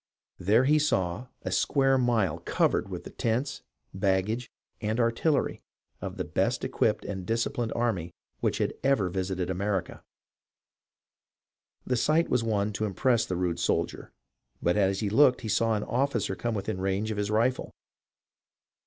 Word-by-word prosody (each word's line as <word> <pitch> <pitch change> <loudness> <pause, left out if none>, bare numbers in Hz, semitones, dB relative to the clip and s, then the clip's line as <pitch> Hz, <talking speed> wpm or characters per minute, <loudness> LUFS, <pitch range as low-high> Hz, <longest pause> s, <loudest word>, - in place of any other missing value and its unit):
There 105 +7 +4
he 150 +3 +4
saw 105 - 0 0.2
a - - -3
square 135 -1 +3
mile 120 -6 +1
covered - - +1
with - - -6
the - - -9
tents, 125 +5 -1 0.3
baggage, 100 +5 0 0.3
and 110 +2 -1
artillery 120 +6 +1 0.4
of - - -5
the - - -1
best - - 0
equipped - - 0
and 95 -2 -4
disciplined 115 +2 -1
army 100 -8 -1 0.3
which - - 0
had - - 0
ever 135 -9 +2
visited 95 0 -2
America. 95 0 -2 1.8
The 125 - 0
sight 155 +7 +2
was 125 -2 +2
one 105 -2 0
to 110 - -1
impress 115 +3 +1
the 90 - -2
rude 90 -2 -1
soldier, - - -1 0.5
but 85 - +1
as 100 -1 +2
he 105 - 0
looked 130 +2 +5
he 115 - -5
saw 115 +1 +2
an 105 - -1
officer 120 -6 0
come 120 +3 -2
within 95 -2 -3
range 95 +3 -1
of 105 - -3
his 105 0 -1
rifle. 115 +4 +1
110 Hz, 155 wpm, -28 LUFS, 95-125 Hz, 1.8 s, looked